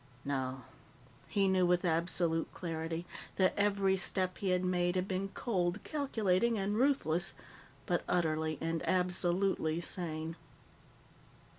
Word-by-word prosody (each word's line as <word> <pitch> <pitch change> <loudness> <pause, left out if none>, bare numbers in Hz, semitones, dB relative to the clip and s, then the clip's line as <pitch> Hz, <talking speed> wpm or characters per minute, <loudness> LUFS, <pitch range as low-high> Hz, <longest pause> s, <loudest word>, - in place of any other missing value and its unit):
No. 130 -2 -2 0.6
He 200 -1 +2
knew 185 -1 +3
with 180 +1 +2
absolute 165 0 +1
clarity 165 0 -4 0.3
that 185 -1 +3
every 200 -1 +2
step 185 -1 0
he 195 - -1
had 180 0 +2
made 175 0 +1
had 185 +1 0
been 195 +1 -2
cold, 185 -4 0
calculating, 230 - +1
and 200 +1 -1
ruthless, 215 - +2 0.5
but - - +1
utterly 155 -2 +1
and 165 0 -1
absolutely 180 -2 +1
sane. 165 -2 -4
180 Hz, 120 wpm, -33 LUFS, 165-195 Hz, 0.6 s, knew